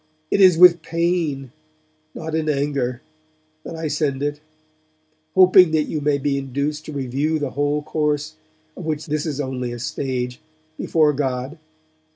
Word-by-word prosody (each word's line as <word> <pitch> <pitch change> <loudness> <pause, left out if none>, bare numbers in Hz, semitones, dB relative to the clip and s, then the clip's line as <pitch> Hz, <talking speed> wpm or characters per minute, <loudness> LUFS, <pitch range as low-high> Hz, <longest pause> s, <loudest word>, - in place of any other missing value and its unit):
It 200 - +3
is 185 -3 +7
with 175 -1 +7
pain, 165 -6 -1 0.6
not 160 -1 -6
in 160 -1 0
anger, 140 -4 -1 0.6
that - - -7
I 160 -1 -3
send 145 -2 -1
it; 145 0 -2 1.0
hoping 185 -1 +7
that 155 -1 +3
you 150 0 -4
may 145 0 +2
be 140 0 -1
induced 140 +3 -3
to - - -7
review 140 +3 -1
the 145 -3 -3
whole 145 +1 -1
course, 150 0 -1 0.4
of 185 - -8
which 155 -1 -3
this 150 -1 -2
is 145 -2 -3
only 130 -3 -3
a 120 - -5
stage, 125 0 -3 0.4
before 155 -2 +2
God. 135 +2 -3
150 Hz, 155 wpm, -21 LUFS, 135-160 Hz, 1.0 s, is